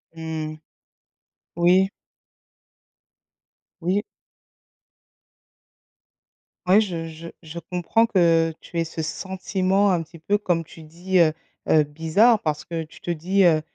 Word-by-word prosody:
Mmh 160 -1 -5
mh, 155 - -14 1.0
oui. 180 +3 +4 1.9
Oui. 185 +4 +1 2.7
Ouais, 195 +4 +6
je 170 -6 -4
je 160 +1 -10
je 165 0 -10
comprends 180 +7 +1
que 165 -6 +3
tu 170 - -8
aies - - +2
ce 165 0 -5
sentiment, 190 +3 0
un 170 -2 +1
petit 165 +1 -15
peu, 200 +6 +1
comme 175 -5 -1
tu 160 +1 -14
dis, 175 +4 -2
heu 160 -2 +5 0.4
heu, 155 -1 +5
bizarre 165 +10 +3
parce 150 -2 -2
que 165 -1 -4
tu 155 - -16
te 175 - -3
dis, 185 +4 +1
heu: 160 -3 +4
170 Hz, 125 wpm, -23 LUFS, 160-190 Hz, 2.7 s, Ouais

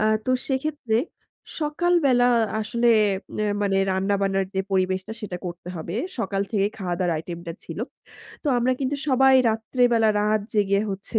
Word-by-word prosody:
আ - - +1 0.2
তো - - -1 0.2
সেক্ষেত্রে 265 -4 -1 0.6
সকাল 315 +4 +1
বেলা 245 -2 +4 0.3
আসলে 235 +2 0 0.5
নের 210 -1 +1
মানে 195 -1 +1
রান্না-বান্নার 195 0 0
যে 190 - +1
পরিবেশটা 190 +2 0
সেটা 200 -4 -5
করতে 175 0 -7
হবে, 165 +2 -5 0.2
সকাল 200 -3 -1
থেকেই 205 -1 +1
খাওয়া-দাওয়ার 175 -2 -1
আইটেম 170 +2 -6
টা 165 - -4
ছিল। - - -7 0.6
তো - - -7
আমরা 245 +2 +2
কিন্তু 275 +1 -1
সবাই 265 0 +5 0.2
রাত্রেবেলা 225 0 +2
রাত 215 +1 +2
জেগে 200 -1 +2
হচ্ছে 195 +3 -3
210 Hz, 150 wpm, -24 LUFS, 190-245 Hz, 0.6 s, সবাই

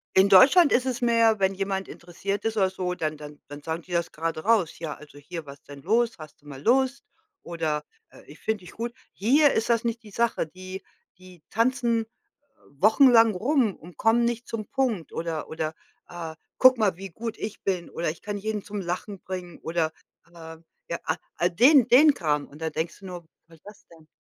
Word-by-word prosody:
In 190 +1 +6
Deutschland 285 - +7
ist 255 +1 +3
es 245 -1 -2
mehr, 230 -3 +3
wenn 190 0 +2
jemand 195 0 -3
interessiert 195 +4 -5
ist 225 -1 -2
oder 190 -2 +3
so, 180 -1 -3
dann 155 -2 -2
dann 150 0 -11
dann 145 +1 -9
sagen 160 +2 -4
die 180 - -16
das 170 -1 -1
grade 160 0 -3
raus: 205 -9 +2
„Ja, 155 -4 -5
also 145 -1 -15
hier, 165 +2 -8
was 140 0 -12
denn 140 -1 -12
los? 230 +3 +1
Hast 155 -2 -13
du 145 - -19
mal 135 -2 -9
Lust?” 265 +3 +2 0.4
oder, 160 -3 -2 0.3
äh, - - -17
„Ich 150 - -15
finde 220 -2 -2
dich - - -11
gut.” 235 +1 -5 0.2
Hier 280 +8 +4
ist 220 - -1
das 230 -1 +2
nicht 235 0 -2
die 215 - -14
Sache. 230 -5 0
Die 185 +3 -9 0.4
die 185 -3 -16
tanzen 235 0 +1 0.7
wochenlang 225 - +5
rum 245 -1 +1
und 175 +2 -15
kommen 230 +2 +3
nicht 235 0 -2
zum 215 -2 -4
Punkt 245 - -1
oder 165 -2 -4
oder, 160 0 -3 0.3
äh: 165 -2 -7 0.2
„Guck 255 -1 +7
mal, 200 -5 +2
wie 195 0 -7
gut 225 +6 -6
ich 215 0 -6
bin” 185 -3 -2
oder 170 -1 -2
„Ich 160 - -7
kann 205 0 -4
jeden 215 0 -3
zum 205 -1 -5
Lachen 185 +3 -4
bringen” 180 -2 -7
oder 160 -1 -1 0.3
aber, 165 -1 -12 0.3
ja, 170 - -2
ah, 175 - -2
den 250 - +5
den 285 +4 +7
Kram 150 -3 -1
und 150 +3 -15
da 160 - -2
denkst 160 +5 -4
du 195 - -13
nur: 175 -2 -8 0.2
„Was 165 -1 -18
ist - - -36
das 205 0 -14
denn?” 160 -2 -19
190 Hz, 205 wpm, -26 LUFS, 165-230 Hz, 0.7 s, Deutschland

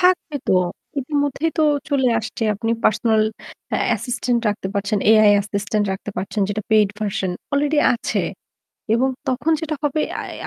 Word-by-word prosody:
থাকবে 360 -4 +2
তো। - - +4 0.5
ইতিমধ্যেই 290 +3 -1
তো - - +4 0.3
চলে 265 -3 +3
আসছে। 225 +1 -6
আপনি 225 +3 -2
পার্সোনাল 220 0 +3 0.5
অ্যা - - 0
অ্যাসিস্ট্যান্ট 240 +2 0
রাখতে 205 -2 -2
পারছেন, 205 +1 0
AI 215 -1 +7
অ্যাসিস্ট্যান্ট 205 +1 -1
রাখতে 190 +2 -6
পারছেন 200 +2 -3
যেটা 210 +1 -2
পেইড 215 -2 +5
ভার্সন 200 -3 -1 0.2
অলরেডি 290 +2 +2 0.2
আছে। 235 - -1 0.7
এবং 255 +3 +2 0.2
তখন 270 +5 +1
যেটা 320 -2 -2
হবে 295 +1 +1 0.2
আই - - -7
225 Hz, 150 wpm, -21 LUFS, 210-285 Hz, 0.7 s, AI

